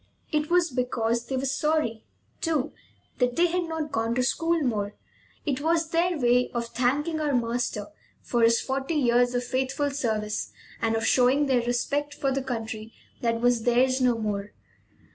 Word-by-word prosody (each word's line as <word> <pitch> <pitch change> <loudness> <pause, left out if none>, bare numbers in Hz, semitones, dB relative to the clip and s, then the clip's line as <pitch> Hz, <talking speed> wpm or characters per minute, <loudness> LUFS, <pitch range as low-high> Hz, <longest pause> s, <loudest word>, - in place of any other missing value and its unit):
It 300 -1 0
was 345 -2 +3
because 235 -2 -1
they 265 - -2
were 265 - -1
sorry, 275 -5 0 0.4
too, 310 -4 0 0.5
that 250 -1 +2
they 345 - +4
had 350 0 0
not 320 -2 -4
gone 230 -3 0
to 255 - +2
school 330 +6 +1
more. 210 -5 -1 0.5
It 285 -3 -1
was 325 +1 +1
their 340 +1 +2
way 250 -1 +3
of 235 -1 -2
thanking 290 +7 0
our 290 -3 +1
master 235 -3 -1 0.3
for 240 - -1
his 230 0 +5
forty 270 +4 -2
years 245 -3 +3
of 245 - 0
faithful 265 +3 -1
service 215 -6 -2 0.3
and 225 0 +1
of 225 - -1
showing 260 +3 +4
their 260 -3 +2
respect 280 +5 -1
for 275 - 0
the 270 +1 0
country 225 -3 -5 0.3
that 230 -1 0
was 245 -1 +3
theirs 255 +3 +3
no 245 -2 +3
more. 210 -2 -3
250 Hz, 170 wpm, -26 LUFS, 235-290 Hz, 0.5 s, his